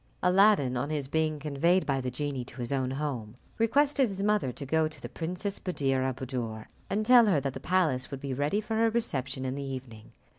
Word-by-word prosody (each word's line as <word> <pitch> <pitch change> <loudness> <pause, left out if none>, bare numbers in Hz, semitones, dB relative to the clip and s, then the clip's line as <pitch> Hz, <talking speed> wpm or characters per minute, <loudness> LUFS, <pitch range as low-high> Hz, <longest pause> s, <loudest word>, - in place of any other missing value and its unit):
Aladdin, 180 -9 +4
on 140 +4 -2
his 150 -3 -2
being 155 +1 0
conveyed 155 +5 +1
by 135 -2 0
the 125 - -2
genie 135 0 -3
to 125 - -11
his 120 +1 -3
own 130 -2 0
home, 130 -6 -4 0.2
requested 275 +2 +3
his 195 0 -4
mother 210 -11 +2
to 140 - -7
go 160 +3 +2
to 155 - -10
the - - -6
Princess 180 +4 -4
Buddir 135 -7 0
al 130 0 0
Buddoor, 120 -4 -4 0.2
and 215 +2 0
tell 240 -1 +7
her 180 -8 +3
that 135 -1 -3
the - - -6
palace 165 -9 +1
would 140 - -6
be 135 -1 -4
ready 145 +10 0
for 215 +1 -5
her 225 0 +4
reception 140 - -2
in 130 - -2
the 140 - -4
evening. 130 -5 -7
145 Hz, 220 wpm, -29 LUFS, 130-190 Hz, 0.2 s, tell